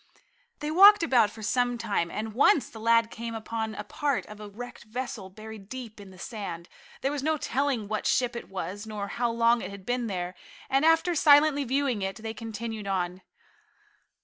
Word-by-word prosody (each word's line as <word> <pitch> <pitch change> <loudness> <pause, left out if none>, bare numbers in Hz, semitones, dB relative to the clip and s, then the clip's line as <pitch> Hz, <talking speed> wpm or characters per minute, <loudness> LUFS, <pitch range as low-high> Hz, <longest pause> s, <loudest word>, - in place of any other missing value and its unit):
They 300 +1 -2
walked 400 +3 +8
about 245 -9 +4
for 220 +1 -11
some 245 +2 +1
time, 205 -7 -1
and 220 +3 -4
once 285 - +4
the 220 - -10
lad 230 0 +3
came 230 0 -6
upon 220 0 -4
a - - -5
part 295 -3 -1
of 210 0 -11
a 210 -1 -8
wrecked 245 +4 -9
vessel 235 -3 -5
buried 215 0 -11
deep 240 -4 -8
in 200 - -12
the 185 - -15
sand. 185 -5 -6 0.3
There 270 - 0
was 290 -2 -3
no 310 +2 +1
telling 270 -6 -1
what 215 0 -2
ship 245 -1 +1
it 235 - -7
was, 195 +3 -5
nor 205 -2 -5
how 240 +2 0
long 230 0 +3
it 185 - -5
had 200 -1 -10
been 245 -1 -1
there, 180 -3 -3 0.4
and 270 +2 +3
after 325 +2 +4
silently 290 -2 +5
viewing 260 -3 0
it, 195 0 -2
they 220 -1 -6
continued 225 -1 -6
on. 185 -1 -2
230 Hz, 195 wpm, -27 LUFS, 205-260 Hz, 0.4 s, walked